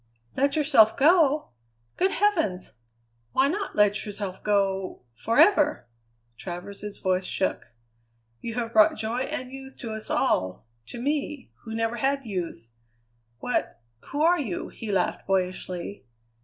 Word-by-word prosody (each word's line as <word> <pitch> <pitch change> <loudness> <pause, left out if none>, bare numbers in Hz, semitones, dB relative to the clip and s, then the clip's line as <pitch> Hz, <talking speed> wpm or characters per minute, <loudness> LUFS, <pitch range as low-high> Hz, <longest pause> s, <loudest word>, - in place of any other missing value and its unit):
"Let 280 +1 +2
yourself 275 -8 +5
go? 305 0 +4 0.5
Good 375 - +2
heavens! 320 - +1 0.6
Why 265 +1 +4
not 390 +6 -3
let 205 -1 +3
yourself 200 -2 -6
go 195 -6 0
forever?" 300 - +3 0.5
Travers's 200 +3 -7
voice 185 -1 0
shook. 190 - -1 0.7
"You 230 -1 -5
have 235 -1 -3
brought 215 -1 +6
joy 220 +3 -1
and 255 -1 -4
youth 270 0 -10
to 230 - -6
us 220 +3 -6
all 110 - 0 0.2
to 240 - -7
me, 285 +1 -2
who 225 0 -5
never 225 +1 -1
had 275 +2 0
youth. 170 - -5 0.7
What - - -1 0.3
who 290 +2 -1
are 350 +2 +4
you?" 220 -12 -3
he 220 -2 -6
laughed 180 -2 0
boyishly. 185 -3 -2
225 Hz, 130 wpm, -26 LUFS, 195-280 Hz, 0.7 s, brought